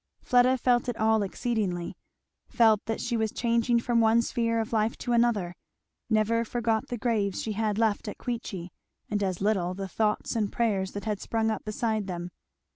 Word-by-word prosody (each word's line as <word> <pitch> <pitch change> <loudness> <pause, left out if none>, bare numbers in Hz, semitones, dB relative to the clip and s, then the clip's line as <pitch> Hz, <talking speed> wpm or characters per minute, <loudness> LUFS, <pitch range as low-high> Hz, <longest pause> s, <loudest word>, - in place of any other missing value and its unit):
Fleda 250 +1 +4
felt 245 -1 +2
it 240 - -3
all 220 0 +3
exceedingly; 195 -4 -2 0.5
felt 220 -3 +4
that 225 - -2
she 240 -1 -2
was 220 -2 0
changing 235 0 +1
from 235 0 +1
one 225 +1 +4
sphere 230 -1 0
of 225 +1 -3
life 220 +1 +1
to 245 - -2
another; 230 -7 +2 0.6
never 225 +1 +2
forgot 230 -1 -1
the 245 - -4
graves 215 -5 0
she 220 - -3
had 210 -1 -1
left 220 -1 +1
at 210 - -5
Queechy, 195 -8 -5 0.4
and 205 -1 0
as 190 -2 -1
little 190 -3 +1
the 195 0 -4
thoughts 210 +4 -1
and 210 -3 0
prayers 200 -5 0
that 205 - -6
had 210 -2 -2
sprung 225 -1 0
up 220 - -4
beside 215 -1 -1
them. 175 -1 -5
220 Hz, 185 wpm, -27 LUFS, 205-235 Hz, 0.6 s, Fleda